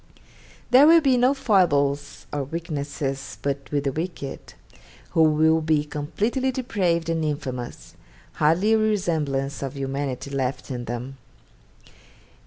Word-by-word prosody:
There 265 Hz, +4 st, +8 dB
will 335 Hz, +1 st, +8 dB
be 270 Hz, -4 st, +3 dB
no 250 Hz, +3 st, +3 dB
foibles 145 Hz, -, +1 dB
or 145 Hz, -1 st, -1 dB
weaknesses 140 Hz, -3 st, -4 dB
but 140 Hz, -1 st, -3 dB
with 145 Hz, -1 st, 0 dB
the 140 Hz, -, 0 dB
wicked, 160 Hz, -2 st, -6 dB, 0.6 s
who 165 Hz, -, +2 dB
will 160 Hz, +1 st, +4 dB
be 155 Hz, -1 st, +2 dB
completely 210 Hz, -, -1 dB
depraved 185 Hz, -10 st, -1 dB
and 165 Hz, -1 st, 0 dB
infamous, 130 Hz, -5 st, -4 dB, 0.4 s
hardly 165 Hz, +8 st, +3 dB
a 220 Hz, -, +4 dB
resemblance 160 Hz, -10 st, 0 dB
of 135 Hz, 0 st, -5 dB
humanity 135 Hz, 0 st, -3 dB
left 135 Hz, 0 st, -3 dB
in 120 Hz, -1 st, -4 dB
them. 120 Hz, +3 st, -5 dB
150 Hz, 125 wpm, -24 LUFS, 140-185 Hz, 0.6 s, There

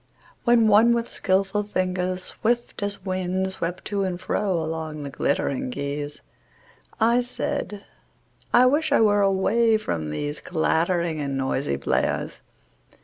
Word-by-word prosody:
WHEN 235 Hz, -2 st, +5 dB
one 220 Hz, +3 st, +6 dB
with 235 Hz, 0 st, -2 dB
skillful 195 Hz, +2 st, +1 dB
fingers 185 Hz, -2 st, -1 dB
swift 240 Hz, +2 st, -2 dB
as 200 Hz, -1 st, -3 dB
wind 185 Hz, 0 st, -1 dB
Swept 175 Hz, -1 st, -4 dB
to 200 Hz, -1 st, -1 dB
and 185 Hz, -2 st, -2 dB
fro 200 Hz, +1 st, -1 dB
along 160 Hz, -2 st, -3 dB
the 140 Hz, -, -6 dB
glittering 140 Hz, -1 st, -1 dB
keys, 145 Hz, +2 st, -4 dB, 0.8 s
I 235 Hz, +2 st, +4 dB
said: 210 Hz, -4 st, -4 dB, 0.7 s
I 245 Hz, +1 st, +6 dB
wish 295 Hz, +5 st, +2 dB
I -, -, +5 dB
were 205 Hz, -2 st, +4 dB
away 215 Hz, +4 st, +3 dB
from 80 Hz, -, -3 dB
these 145 Hz, -, -3 dB
Clattering 170 Hz, 0 st, 0 dB
and 140 Hz, -2 st, -2 dB
noisy 130 Hz, -, -1 dB
players! 70 Hz, -, -1 dB
185 Hz, 135 wpm, -24 LUFS, 155-210 Hz, 0.8 s, one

